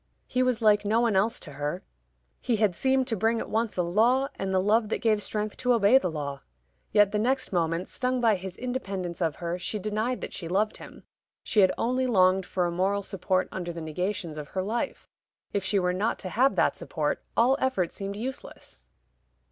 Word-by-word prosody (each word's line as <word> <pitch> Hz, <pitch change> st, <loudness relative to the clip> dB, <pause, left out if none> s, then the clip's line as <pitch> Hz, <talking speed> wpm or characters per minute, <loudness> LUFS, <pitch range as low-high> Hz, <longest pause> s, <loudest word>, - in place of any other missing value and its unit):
He 255 Hz, -, -1 dB
was 250 Hz, -2 st, +1 dB
like 210 Hz, -1 st, +5 dB
no 215 Hz, +3 st, +2 dB
one 235 Hz, -4 st, +2 dB
else 210 Hz, +5 st, +2 dB
to 150 Hz, -, -8 dB
her: 145 Hz, +5 st, -4 dB, 0.6 s
he 240 Hz, -, 0 dB
had 210 Hz, -4 st, +2 dB
seemed 265 Hz, +3 st, +2 dB
to 240 Hz, -3 st, -2 dB
bring 225 Hz, +3 st, +1 dB
at -, -, -6 dB
once 225 Hz, -2 st, -1 dB
a 180 Hz, -, +2 dB
law, 235 Hz, +10 st, +2 dB
and 195 Hz, 0 st, -4 dB
the 190 Hz, -, +3 dB
love 210 Hz, +3 st, +2 dB
that -, -, 0 dB
gave 220 Hz, -3 st, +2 dB
strength 210 Hz, 0 st, -3 dB
to 250 Hz, -1 st, +2 dB
obey 230 Hz, +3 st, +5 dB
the 180 Hz, -, -2 dB
law. 145 Hz, -3 st, -5 dB, 0.5 s
Yet 205 Hz, -1 st, +5 dB
the 210 Hz, -, 0 dB
next 260 Hz, 0 st, 0 dB
moment, 165 Hz, 0 st, 0 dB
stung 255 Hz, 0 st, -1 dB
by 230 Hz, -3 st, +4 dB
his 185 Hz, 0 st, -8 dB
independence 195 Hz, -9 st, -4 dB
of 160 Hz, -4 st, 0 dB
her, 175 Hz, +1 st, -4 dB
she 215 Hz, -, -3 dB
denied 215 Hz, +5 st, -2 dB
that -, -, -6 dB
she 170 Hz, -, -5 dB
loved 200 Hz, +5 st, 0 dB
him; -, -, -12 dB, 0.4 s
she 215 Hz, -, +1 dB
had 190 Hz, -2 st, +6 dB
only 255 Hz, +2 st, 0 dB
longed 185 Hz, -4 st, +3 dB
for 180 Hz, -2 st, 0 dB
a 175 Hz, -, -1 dB
moral 195 Hz, +3 st, 0 dB
support 190 Hz, -1 st, -1 dB
under 175 Hz, -2 st, -4 dB
the 170 Hz, -, -7 dB
negations 170 Hz, +1 st, -3 dB
of 145 Hz, -, -7 dB
her 185 Hz, +5 st, -3 dB
life. 225 Hz, +5 st, -3 dB, 0.5 s
If 200 Hz, -, 0 dB
she 195 Hz, +1 st, +1 dB
were 180 Hz, -1 st, +1 dB
not 205 Hz, +5 st, 0 dB
to -, -, -2 dB
have 260 Hz, +8 st, +2 dB
that -, -, +2 dB
support, -, -, -2 dB
all 250 Hz, +4 st, +5 dB
effort 200 Hz, -10 st, 0 dB
seemed 200 Hz, 0 st, -5 dB
useless. 250 Hz, -, -7 dB
205 Hz, 210 wpm, -27 LUFS, 180-230 Hz, 0.6 s, had